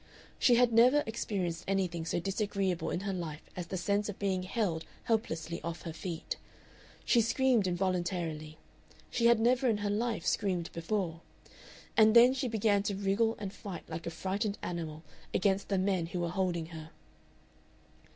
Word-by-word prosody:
She 245 - +5
had 240 -1 +4
never 250 +6 +6
experienced 195 -6 -2
anything 180 -4 0
so - - 0
disagreeable 195 -1 -1
in 175 - -2
her 200 -1 -2
life 165 -4 -5
as 180 -2 -5
the 185 - -3
sense 205 +3 0
of 205 - -5
being 190 -2 0
held 185 -4 -1 0.2
helplessly 170 -7 -1
off 170 +1 -5
her 165 - -5
feet. 165 0 -5 0.7
She 235 - +5
screamed 235 -2 +2
involuntarily 175 -4 -2 0.5
she 235 -1 +3
had 235 -1 +5
never 250 +3 +3
in 220 - +2
her 205 0 -1
life 215 -3 -1
screamed 185 -5 0
before 165 -1 -2 0.7
and 220 0 +6
then 245 +2 +8
she 265 -1 -1
began 215 -3 +2
to 200 0 -2
wriggle 200 +4 +1
and 200 -2 -5
fight 195 -4 -8
like 160 +1 -6
a - - 0
frightened 200 +4 -2
animal 160 -3 -4 0.3
against 195 +1 +1
the 195 - +1
men 185 -3 +1
who 175 +1 -3
were 170 - -1
holding 180 -2 -1
her. 160 -1 -8
195 Hz, 165 wpm, -31 LUFS, 170-215 Hz, 0.7 s, then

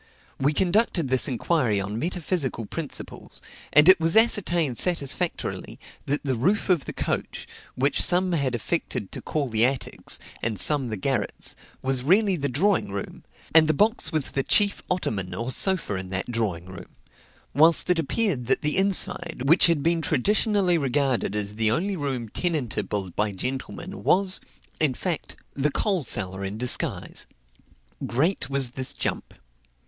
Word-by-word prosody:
We 140 +2 +2
conducted 180 - +1
this 130 -1 +3
inquiry 125 -4 0
on 100 +3 -4
metaphysical 160 - -2
principles; 155 +6 -6 0.3
and 150 +2 +6
it 185 -1 +8
was 165 +4 +2
ascertained 175 - +2
satisfactorily, 170 0 0 0.3
that 145 +2 -1
the 135 -2 -1
roof 180 - 0
of 165 -7 +1
the - - -5
coach, - - -4 0.3
which 135 +2 +1
some 180 +1 +2
had 140 -7 0
affected 120 - -3
to - - -6
call 150 -3 -2
the 110 -2 +1
attics, 130 +1 -1 0.2
and 110 -4 -2
some 145 -4 +5
the 110 -2 -4
garrets, 130 +6 -1 0.3
was 130 -1 +1
really 195 - +3
the 140 -4 -2
drawing 175 - +1
room, 100 0 -6 0.3
and 160 -1 +6
the 155 - +2
box 210 -3 +2
was 155 -4 -2
the 135 - 0
chief 200 +8 +2
ottoman 100 - -2
or 115 +6 -3
sofa 185 - +2
in 95 0 -7
that 95 +5 -4
drawing 105 -8 -2
room; 95 0 -12 0.6
whilst 160 +4 +5
it 175 - +1
appeared 160 - 0
that - - 0
the 150 +2 +1
inside, 180 -6 +1
which 165 +6 +6
had 165 -4 +1
been 165 0 +1
traditionally 195 - +1
regarded 135 -5 0
as 105 0 -4
the 110 -1 +2
only 190 - -1
room 135 -7 -3
tenantable 110 - -2
by 105 +3 -1
gentlemen, 130 - -6
was, 190 0 +3 0.4
in 145 -5 +1
fact, 175 +1 -4 0.2
the 140 +2 0
coal 190 +4 0
cellar 95 -6 0
in 100 +2 -5
disguise. 125 +2 -1 0.8
Great 135 - 0
wits 130 -1 -2
jump. - - -4
140 Hz, 155 wpm, -24 LUFS, 120-175 Hz, 0.8 s, it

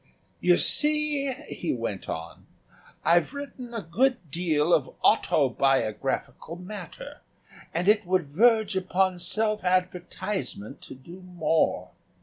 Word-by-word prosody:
"You 175 -1 +4
see," 300 -2 +2 0.2
he 170 - -3
went 115 -5 -5
on, 80 +1 -7 0.6
"I've 175 - +3
written 270 -4 -8
a 230 -3 -5
good 195 - 0
deal 165 -1 +1
of 135 -4 +2
autobiographical 135 +2 +1
matter 180 0 -9 0.5
and 175 +3 -2
it 210 +1 +5
would 185 -1 +2
verge 220 +8 +3
upon 185 0 0
self 215 +2 0
advertisement 180 - -2
to - - -11
do 170 +8 -13
more. 175 -3 0
180 Hz, 115 wpm, -26 LUFS, 155-215 Hz, 0.6 s, it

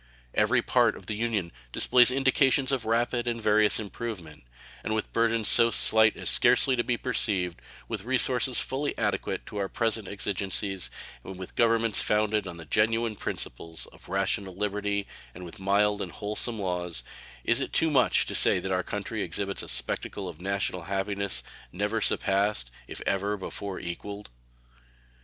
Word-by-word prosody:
Every - - +2
part - - +2
of - - -13
the - - -4
Union 105 -5 -2 0.2
displays 125 - +6
indications 135 +1 +3
of 130 -4 -1
rapid 120 +2 0
and 115 -1 -1
various 105 -1 +3
improvement; 95 - -7 0.4
and 110 - -1
with 110 - -3
burthens 115 -1 +1
so 115 0 +7 0.2
light 110 -1 +5
as - - -5
scarcely 130 - +5
to 120 - 0
be 120 -1 -1
perceived, 95 -9 0 0.3
with - - -4
resources 130 0 +2
fully 140 +2 -2
adequate - - -2
to 105 - -8
our 100 -1 -2
present 115 -3 -1
exigencies, 100 -1 -2 0.3
with 95 -1 -9
governments 115 -2 +2
founded 105 -1 +1
on 85 -2 -7
the 80 - -10
genuine 115 +6 +1
principles 80 -2 -5
of - - -16
rational 95 0 -1
liberty, 100 0 -2 0.3
and 90 +1 -8
with 85 - -11
mild 100 +1 +2
and 90 - -5
wholesome 105 +3 -2
laws, 90 -7 -3 0.4
is 120 +2 +2
it 135 - -3
too 160 -1 +2
much 130 -4 +3
to - - -5
say - - +5
that 95 +1 -4
our 90 0 +1
country 105 +3 -4
exhibits 100 +3 -2
a - - -8
spectacle 100 -2 -2
of 85 -1 -9
national 95 -1 -1
happiness 100 +1 -2 0.3
never 105 +4 -1
surpassed, 100 - +1 0.2
if - - -7
ever 100 +2 0
before 95 0 -5
equaled? 100 0 -7
105 Hz, 160 wpm, -27 LUFS, 95-115 Hz, 0.4 s, so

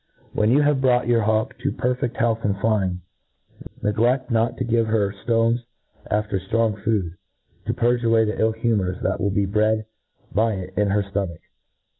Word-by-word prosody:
"When 105 0 +2
you 140 +5 +4
have 145 -2 +2
brought 125 -2 +3
your 120 -1 +3
hawk 110 +4 0
to 140 +3 -1
per 125 +1 0
fcft 125 -1 -3
health 115 -1 +1
and 100 -1 -1
dying, 100 -5 0 0.8
negled 120 +5 +1
not 115 0 +1
to - - -1
give 115 -1 +1
her 105 -3 +1
ftones 115 0 +2 0.5
after 105 -2 0
ftrong 105 +1 -1
food, 100 -7 0 0.5
to - - 0
purge 120 0 +1
away 115 -1 +4
the 105 +1 -1
iff 110 0 +1
humours 105 -6 0
that - - -1
will 100 - +1
be 100 0 +1
bred 110 +2 +1 0.5
by 110 +3 +2
it 95 -1 -6
in 105 - +2
her 100 +1 +1
fto 100 0 -2
mach. 85 - -12
110 Hz, 185 wpm, -23 LUFS, 100-115 Hz, 0.8 s, you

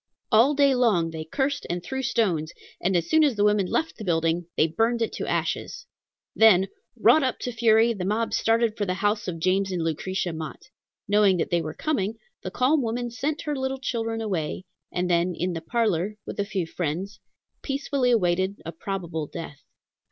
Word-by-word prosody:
All 240 +7 +5
day 280 -1 +4
long 210 -10 +2
they 160 -1 -5
cursed 275 - -2
and 175 0 -2
threw 265 +8 -3
stones, 175 -11 0 0.3
and 185 0 +2
as 170 - -1
soon 315 0 +4
as 280 -6 +3
the 205 - +1
women 210 -2 +3
left 320 - -1
the 220 - -7
building, 165 -1 0
they - - +5
burned 225 +8 +1
it 225 - -3
to - - -4
ashes. 485 0 -2 0.5
Then, 195 -4 +6 0.3
wrought 315 - +5
up 260 -2 0
to 250 - -3
fury, 225 0 +4
the 195 -5 -5
mob 215 +4 -1
started 225 -1 +2
for 205 -2 -2
the 185 - 0
house 205 +2 0
of 175 -2 -3
James 190 +3 +1
and 175 -3 -1
Lucretia 175 +2 -2
Mott. 160 - -7 0.4
Knowing 205 -2 +4
that 165 - -2
they 170 -1 +2
were 155 -1 -6
coming, 225 -9 -1 0.3
the - - -4
calm 275 +4 +2
woman 240 0 -2
sent 285 +6 -3
her 300 -2 -2
little 265 0 -2
children 225 -3 -2
away, 185 -4 -3 0.3
and 180 0 -1
then 175 0 +1
in 180 +1 -1
the 165 - -4
parlor, 210 -1 0
with - - -7
a 200 - +1
few 195 -4 -2
friends, 175 +5 -4 0.4
peacefully 275 -2 -1
awaited 190 -3 +1
a 165 - -4
probable 170 -3 -4
death. 160 -3 -8
205 Hz, 195 wpm, -25 LUFS, 175-235 Hz, 0.5 s, Then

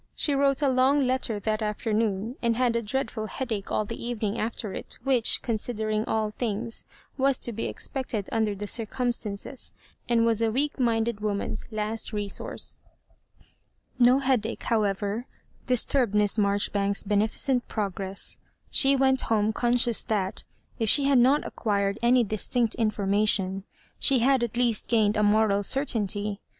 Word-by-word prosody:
She 290 - +1
wrote 275 0 +2
a - - +4
long 265 +2 +3
letter 255 -4 -1
that 215 +1 -1
after 215 +1 -2
noon, 215 +1 -1
and 235 -1 +1
had 245 -1 +1
a 235 - +1
dreadful 220 -1 -3
headache 220 -5 -4
all 215 - 0
the 230 - -7
even 235 -3 -2
.ing - - -5
after 220 -2 -3
it, - - -7
which, 255 -4 +3
considering 220 -1 -2
all 215 -1 -1
things, 225 0 -2 0.3
was 270 -1 +3
to 235 - -1
be 225 - -3
expected 250 -7 -3
under 220 -2 0
the 205 +1 -5
drcumstances, 230 +1 -2 0.4
and 230 -1 +3
was 230 -1 +2
a, 225 -1 +2
weak 285 +5 -1
minded 230 -2 +1
woman's 210 -1 -3
last 215 +1 -3
resourca 205 -2 -3 0.6
y - - -25 0.5
No 245 +1 +6
headache, 255 -5 -1
however, 210 +1 -1 0.4
disturbed 250 -2 +1
Mias 210 -1 +2
Maijori 200 -2 +1
banks's 200 0 +1
beneficent 220 +5 +1
progresa 195 -2 -4 0.3
She 275 0 +5
went 265 -1 +3
home 215 -1 +2
conscious 240 -1 +2
that, 195 -3 -2 0.3
if 225 -2 +1
she 285 +5 +6
hwl 275 -2 +4
not 265 +5 +4
acquired 200 -1 -1
any 245 +1 +4
dis' 215 -2 -2
tinct 240 -3 +1
information, 200 -3 0 0.3
she 275 - +4
had 255 +1 +3
at 235 0 -3
least 240 -3 +1
gained 215 -3 +2
a 210 - +1
moral 210 -1 +3
certainty. 210 -4 -1
225 Hz, 160 wpm, -26 LUFS, 210-245 Hz, 0.6 s, No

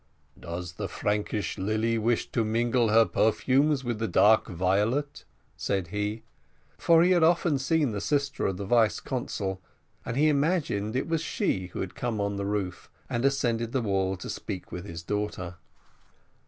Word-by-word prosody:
"Does 85 +1 -6
the 100 +1 -4
Frankish 105 -2 -2
lily 110 +3 0
wish 115 +1 0
to 115 - +1
mingle 115 +2 +1
her 115 +1 +6
perfumes 135 +7 +2
with 120 -3 -2
the 115 - -1
dark 110 +1 +4
violet?" 105 - 0 0.3
said 95 -4 -2
he, 105 +3 -3 0.5
for 165 0 +4
he 180 - +4
had 175 -2 +4
often 165 -3 +3
seen 150 -1 +1
the 100 -2 -3
sister 140 +1 0
of 95 - -2
the 100 - -4
vice 115 +1 +3
consul, 100 -7 -3 0.4
and 115 - -4
he 150 +2 +4
imagined 140 - +1
it 130 - -1
was 165 -1 0
she 130 - -1
who 90 - -6
had 95 - -4
come 120 -3 -3
on 100 0 -1
the 100 0 -3
roof 100 -3 -3 0.2
and 120 - -1
ascended 120 -4 0
the 130 - +1
wall 95 -2 0
to 90 - -8
speak 95 -4 -6
with 90 +1 -6
his 85 -3 -7
daughter. 95 -3 -3
110 Hz, 170 wpm, -27 LUFS, 100-135 Hz, 0.5 s, her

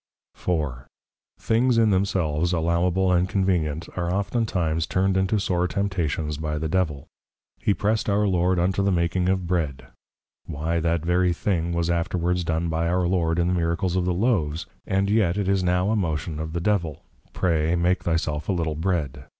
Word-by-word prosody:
_ 85 -4 0 0.2
IV. - - -24 0.5
Things 120 +2 +2
in 110 -2 +4
themselves 90 -4 +1
Allowable 85 +3 +1
and 90 +1 +2
Convenient, 85 -5 0
are 85 -1 -1
oftentimes 90 -5 -1
turned 95 +1 +1
into 95 +3 +1
sore 90 -2 0
Temptations 85 -6 -2
by 75 0 -3
the 80 +1 -2
Devil. 80 -5 -1 0.5
He 100 - +1
press'd 110 +1 0
our 105 +1 +2
Lord 90 -1 +2
unto 95 +3 +1
the 100 0 +2
making 90 +1 +1
of 95 -1 0
Bread; 75 -8 -2 0.6
Why, 80 +4 -2
that 85 0 0
very 90 +1 +2
thing 85 -2 -1
was 85 0 0
afterwards 90 +1 0
done 80 +1 -1
by 80 +1 -1
our 90 +1 +1
Lord, 85 -2 +1
in 85 - +2
the - - +1
Miracles 85 +1 0
of 90 -1 +1
the 90 - +1
Loaves; 85 -7 0 0.2
and 95 +1 +1
yet 100 -4 +2
it 100 -2 -1
is 95 -1 +2
now 90 +3 +1
a - - +2
motion 80 -5 -2
of 80 0 -5
the 85 - -1
Devil, 85 -6 -1 0.3
_Pray, 85 -1 +1
make 90 +2 +1
thy 85 - +1
self 75 -1 -2
a - - +3
Little 80 -3 -1
Bread. 75 -6 -2
90 Hz, 185 wpm, -24 LUFS, 80-95 Hz, 0.6 s, in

